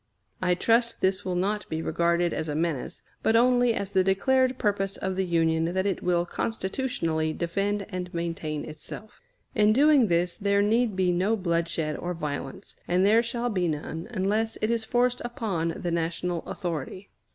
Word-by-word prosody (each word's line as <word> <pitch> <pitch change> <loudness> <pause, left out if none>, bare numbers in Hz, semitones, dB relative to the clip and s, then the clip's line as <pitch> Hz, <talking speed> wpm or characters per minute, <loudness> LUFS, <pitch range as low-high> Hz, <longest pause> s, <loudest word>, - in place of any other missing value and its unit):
I 180 -1 +2
trust 235 +4 +2
this 190 +1 +1
will 185 -1 -2
not 205 +4 -1
be 160 - -2
regarded 170 +1 +1
as 155 0 -3
a 145 - -2
menace, 160 -4 -2 0.2
but 225 - +2
only 245 0 +4
as 200 0 -3
the 190 -2 +3
declared 255 +7 +2
purpose 200 -4 0
of 190 - -2
the 190 0 -1
Union 165 -1 +2
that 190 +1 +1
it 195 -3 -1
will 175 -1 +1
constitutionally 190 - -2
defend 200 +5 -1
and 180 -3 -5
maintain 165 -3 -3
itself. 155 +7 -10 0.3
In 210 0 +4
doing 280 -1 +5
this 175 0 +1
there 200 -1 +2
need 225 0 +2
be 185 -1 +2
no 190 +6 +1
bloodshed 170 -5 -1
or 175 0 -4
violence, 145 -4 -5
and 180 +2 +3
there 220 +3 +5
shall 235 +1 -2
be 180 -4 0
none 160 +2 -4
unless 220 +1 0
it 215 - 0
is 230 -1 -1
forced 245 +1 +1
upon 195 -9 -2
the 175 - -3
national 170 +1 -1
authority. 175 +2 -5
190 Hz, 175 wpm, -27 LUFS, 170-220 Hz, 0.3 s, doing